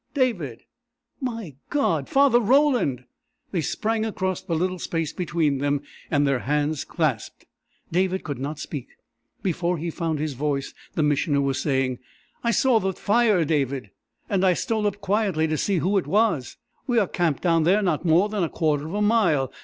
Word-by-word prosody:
"David!" 195 - -1 0.6
"My 230 - -4 0.2
God 165 - 0
Father 270 -3 +5
Roland!" 245 - +2 0.5
They 175 - 0
sprang 220 +8 -1
across 190 -4 -2
the 170 -3 -3
little 185 +2 -1
space 165 -2 -2
between 160 -6 0
them, 145 0 0 0.3
and 145 -2 +2
their 140 -2 +1
hands 150 +3 0
clasped. 150 - -2 0.5
David 185 +2 +1
could 145 -4 -5
not 145 +3 -4
speak. 140 -4 -6 0.6
Before 180 -1 0
he 165 +2 -3
found 165 -2 -2
his 150 0 -2
voice, 140 +1 -2 0.2
the 155 - +1
Missioner 145 0 +2
was 135 -1 0
saying: 130 -3 0 0.4
"I 235 - +1
saw 235 0 +3
the 190 -1 -1
fire, 210 -4 +2
David, 135 -7 -1 0.4
and 195 -2 0
I 185 -1 +5
stole 220 +1 0
up 205 - -2
quietly 200 -5 +1
to 155 0 0
see 190 +5 0
who 185 +5 +1
it - - -7
was. 205 - +1 0.3
We 245 -2 +1
are 215 - +4
camped 170 -6 -1
down 165 -2 +3
there 190 +6 +3
not 175 -5 0
more 175 +4 +4
than 210 -2 -2
a 165 - 0
quarter 150 -2 0
of 175 - -5
a 210 - +1
mile. 205 - +2
170 Hz, 175 wpm, -24 LUFS, 145-205 Hz, 0.6 s, Father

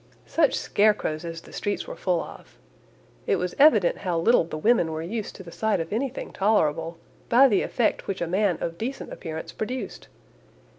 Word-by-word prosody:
Such 315 -4 +2
scarecrows 205 -7 +1
as 165 -1 -6
the - - -15
streets 205 0 -2
were - - -7
full 180 -3 0
of! - - -13 0.7
It - - +3
was 180 0 -2
evident 225 - +5
how 180 -4 -1
little 220 +7 +4
the 160 - -6
women 175 -2 +3
were 160 0 -4
used 210 +5 -4
to 190 - -10
the 170 - -11
sight 220 +3 0
of 165 +3 -4
anything 260 +3 -3
tolerable, 165 -5 +1 0.3
by 260 +4 +7
the 205 -6 +2
effect 235 - 0
which 195 -1 -3
a 170 - -1
man 185 0 +1
of 170 0 -4
decent 260 +5 -4
appearance 160 -2 -6
produced. 250 +4 -5
195 Hz, 185 wpm, -25 LUFS, 165-225 Hz, 0.7 s, by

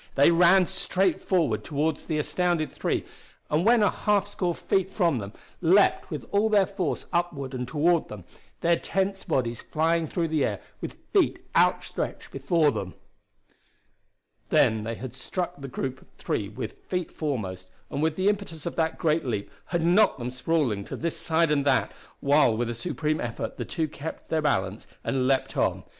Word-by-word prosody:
They 140 +4 +6
ran 175 +2 +6
straight 190 0 0
forward 175 -6 +1
toward 150 +1 0
the 155 - -3
astounded 165 -1 0
three, - - -1 0.5
and 155 +3 +2
when 230 +1 +5
a 205 - +4
half 205 -2 +1
score 180 -4 -2
feet 190 -1 0
from 170 - +1
them, 100 -1 -6 0.3
leaped 185 +4 +4
with 150 - -5
all 205 +2 +3
their 205 -3 +5
force 185 -4 -3
upward 150 -6 -1
and 125 -1 -3
toward 160 +5 +2
them, 105 -4 -9 0.4
their 170 0 +3
tensed 195 +2 -2
bodies 120 -7 0
flying 165 +1 +1
through 165 0 -1
the 155 -3 +1
air 105 -5 -1 0.2
with - - -6 0.2
feet - - +2
outstretched - - 0
before 145 +3 +2
them. 95 -7 -5 1.5
Then 110 -1 +3
they 115 +1 -3
had 125 +2 -7
struck 175 +7 -4
the 135 - -5
group 130 0 -4
of - - -20
three 100 -2 -2
with 110 +5 -6
feet 180 -2 -2
foremost, 95 - -4 0.2
and 140 - -2
with 160 0 +1
the 190 +3 0
impetus 200 -7 -1
of 170 - -3
that 160 -1 0
great 160 0 +1
leap 105 -6 -3
had 170 -2 -1
knocked 185 +6 +4
them 125 -1 -4
sprawling 130 -6 0
to - - -6
this 170 0 -2
side 165 -1 +1
and 145 -2 +2
that, - - +2 0.3
while 140 -5 +4
with 120 0 -1
a - - -3
supreme 155 +4 -2
effort 120 -2 -4
the - - -3
two 160 -3 -2
kept 155 +1 -8
their 160 -1 +1
balance 100 -8 -1 0.2
and 130 -1 0
leaped 135 -1 +1
on. - - +1
155 Hz, 180 wpm, -26 LUFS, 130-175 Hz, 1.5 s, They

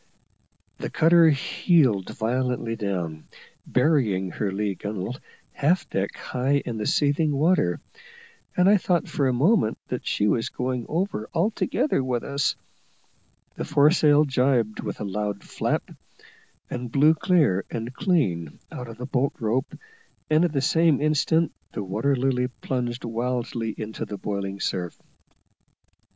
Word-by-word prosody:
The - - -4
cutter 165 0 +5
heeled 140 - +2
violently 120 0 -1
down, 90 -7 -4 0.4
burying 125 - +2
her 100 +3 -2
lee 100 +1 -1
gunwale 105 +5 -5 0.3
half 165 +6 +1
deck 95 +1 -2
high 135 +3 0
in 115 - -4
the 105 - -2
seething 150 +1 +2
water, 145 - +2 0.8
and 180 +1 +5
I 205 +1 +6
thought 175 -3 0
for 140 - 0
a - - +2
moment 135 - +2
that - - -4
she 105 - +1
was 115 +3 +1
going 125 -1 -3
over 165 - -2
altogether 215 - +1
with 125 -2 -1
us; 140 0 0 1.0
the - - -5
foresail 150 0 +4
jibed 125 -5 +1
with - - -5
a - - -3
loud 105 0 -3
flap, - - -2 0.8
and 125 -1 -5
blew 150 +4 +5
clear 160 - +2
and 115 +2 -5
clean 115 - 0
out 125 - -7
of 115 -1 -10
the 125 - -5
bolt 135 +1 0
rope, 120 +5 -1 0.5
and 155 +2 +5
at 175 - +1
the 140 -3 0
same 160 0 +3
instant 155 +2 +2 0.2
the 105 - -3
Water 110 +9 0
Lily 125 -1 +1
plunged 125 -2 -3
wildly 115 -1 -2
into 110 0 -5
the 105 - -6
boiling 100 0 -4
surf. 90 -3 -3
125 Hz, 140 wpm, -25 LUFS, 105-150 Hz, 1.0 s, I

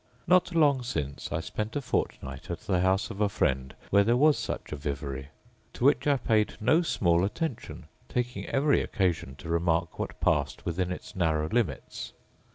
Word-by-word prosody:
Not 180 0 +3
long 145 -5 +4
since 75 - -4
I 85 - -1
spent 105 +6 -4
a - - +1
fortnight 70 - -3
at - - -4
the 90 - 0
house 95 +4 +1
of 105 -1 -6
a 105 - +3
friend 65 -8 0 0.2
where 100 +1 +6
there 120 +4 +3
was 150 +2 +5
such - - -4
a - - -2
vivary, 70 -2 -4 0.5
to 120 - -2
which 145 +1 +4
I 145 -1 +4
paid 110 -4 +1
no 155 +10 +4
small 85 - +2
attention, 105 - -3 0.2
taking 125 0 -2
every 140 +1 +3
occasion 85 -8 -1
to 80 - -11
remark 85 0 0
what - - -4
passed - - 0
within 90 +1 -1
its 90 - -7
narrow 80 -4 +1
limits. 120 -3 -2
95 Hz, 175 wpm, -28 LUFS, 80-125 Hz, 0.5 s, where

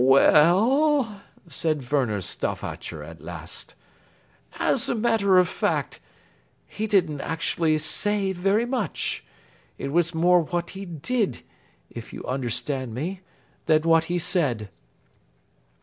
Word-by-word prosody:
"We 135 +1 +6
e 150 +2 +6
ll," 250 - +2 0.3
said 155 -6 -2
Werner 120 -9 +1
Stauffacher 80 -3 -5
at 80 +2 -11
last, - - -7 0.8
"as - - +1
a - - +1
matter 215 -4 +3
of 180 -1 +5
fact, - - -2 0.7
he 220 +1 -4
didn't 175 -9 +1
actually 160 -1 0
say 195 +5 0
very 195 +5 +1
much. 245 -5 -1 0.5
It 140 - -4
was 170 +1 +1
more 175 +2 +4
what 175 +2 -3
he 195 +1 -7
did, 195 - -2 0.5
if - - -9
you - - -7
understand 130 -1 -2
me, 180 +8 -4 0.5
than 155 -1 +4
what 165 0 +4
he 175 +2 -1
said." 135 - 0
170 Hz, 125 wpm, -25 LUFS, 145-200 Hz, 0.8 s, We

